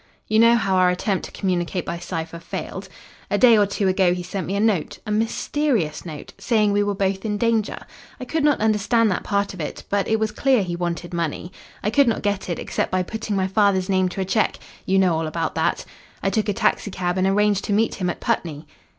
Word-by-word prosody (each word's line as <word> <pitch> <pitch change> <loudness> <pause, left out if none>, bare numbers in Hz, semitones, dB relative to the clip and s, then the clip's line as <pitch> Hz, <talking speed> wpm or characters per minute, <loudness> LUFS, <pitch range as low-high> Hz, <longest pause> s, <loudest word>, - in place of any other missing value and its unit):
You 215 0 +2
know 230 +1 +6
how 195 -5 +1
our 185 -1 +5
attempt 185 +1 -1
to - - -10
communicate 180 -2 -2
by 170 - -4
cipher 165 -1 -5
failed. 190 +3 -6 0.4
"A 205 - +1
day 235 0 +7
or 205 -2 +4
two 200 0 -1
ago 185 -1 +3
he 180 - -5
sent 185 +2 -4
me 195 - -2
a - - 0
note 205 -7 +1
a 210 - -4
mysterious 220 - -1
note 155 -3 -8
saying 215 -4 +2
we 205 0 +2
were 205 0 0
both 195 0 -1
in 210 -2 -1
danger. 225 -1 0 0.4
I 255 - -6
could 320 +4 -1
not 295 -1 +3
understand 220 +1 +2
that 185 - -2
part 200 -1 -1
of 185 - -7
it, 150 - -5
but 200 -1 +1
it 220 0 +1
was 220 -1 0
clear 260 -4 +2
he 175 -2 -3
wanted 175 0 -4
money. 170 +1 -3 0.3
I 210 - 0
could 280 0 +4
not 230 - 0
get 200 -2 -1
it 170 - -2
except - - -2
by 185 0 0
putting 220 +2 -4
my 190 -1 +1
father's 195 -1 +2
name 185 -1 +2
to 190 - -4
a - - -1
cheque. 195 +3 +1 0.3
You 190 - +3
know 185 -3 +4
all 160 0 -1
about 165 +1 -2
that. - - 0 0.4
I - - +1
took 220 -2 0
a - - +1
taxicab 185 -2 0
and 185 - +2
arranged 205 0 +2
to - - -3
meet 220 +3 +2
him 180 -2 -2
at - - -4
Putney." 155 -2 -2
195 Hz, 235 wpm, -22 LUFS, 180-215 Hz, 0.4 s, day